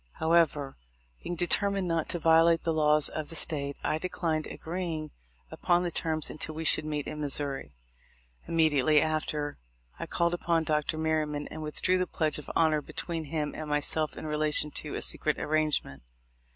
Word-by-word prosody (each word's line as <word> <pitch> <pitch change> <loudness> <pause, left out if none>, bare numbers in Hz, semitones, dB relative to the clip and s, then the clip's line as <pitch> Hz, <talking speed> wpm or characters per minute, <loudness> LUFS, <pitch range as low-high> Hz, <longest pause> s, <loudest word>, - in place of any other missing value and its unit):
However, 160 -4 +1 0.4
being 175 - -4
determined 195 +2 +2
not 165 -2 -1
to 175 - +2
violate 165 0 +4
the 165 - 0
laws 150 -1 +4
of 155 -1 -4
the 165 - -6
State, 140 -3 -2
I 155 - 0
declined 160 -3 -2
agreeing 165 -3 -4 0.4
upon 175 0 +1
the 175 - -1
terms 155 -1 0
until 155 0 -5
we 160 - -4
should 155 0 +2
meet 150 -2 -3
in 150 - -5
Missouri. 140 - -1 0.7
Immediately 155 -3 +3
after, 150 -1 -1 0.4
I - - -4
called 170 0 +1
upon 170 -2 +1
Dr. 155 0 0
Merryman 155 -2 -1
and 155 - -7
withdrew 180 +4 0
the 185 - 0
pledge 155 -3 -1
of 150 - -9
honor 155 -2 +3
be - - -13
tween 165 -2 -3
him 150 0 -3
and 155 -1 -6
myself 150 +1 0
in - - -6
relation 150 0 +1
to - - -4
a - - -1
secret - - 0
arrange 155 0 +1
ment. 70 0 -12
155 Hz, 175 wpm, -29 LUFS, 150-165 Hz, 0.7 s, violate